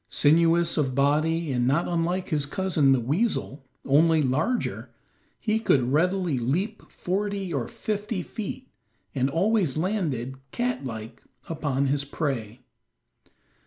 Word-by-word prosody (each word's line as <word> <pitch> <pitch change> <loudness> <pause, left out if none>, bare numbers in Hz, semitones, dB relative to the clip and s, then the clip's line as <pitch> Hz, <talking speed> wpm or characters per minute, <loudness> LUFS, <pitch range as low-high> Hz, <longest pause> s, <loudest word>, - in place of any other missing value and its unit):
Sinuous 165 +3 +3
of 135 -4 0
body 155 +3 +2
and 125 -1 +1
not 145 +6 +2
unlike 175 +2 -1
his 150 -4 0
cousin 160 -5 +2
the 135 - +4
weasel, 140 - -1 0.2
only 160 +4 +4
larger, 155 - -1 0.5
he 220 -1 0
could 130 - +2
readily 180 -2 +1
leap 150 - -1
forty 195 -1 -2
or 130 -5 -1
fifty 210 -2 -3
feet, 230 +7 -6 0.5
and 130 +1 +1
always 180 - +1
landed, 155 - -1
cat 245 - -2
like, 110 -3 -7 0.3
upon 145 -4 -1
his 140 +1 +1
prey. 130 -6 -3
160 Hz, 125 wpm, -26 LUFS, 135-185 Hz, 0.5 s, the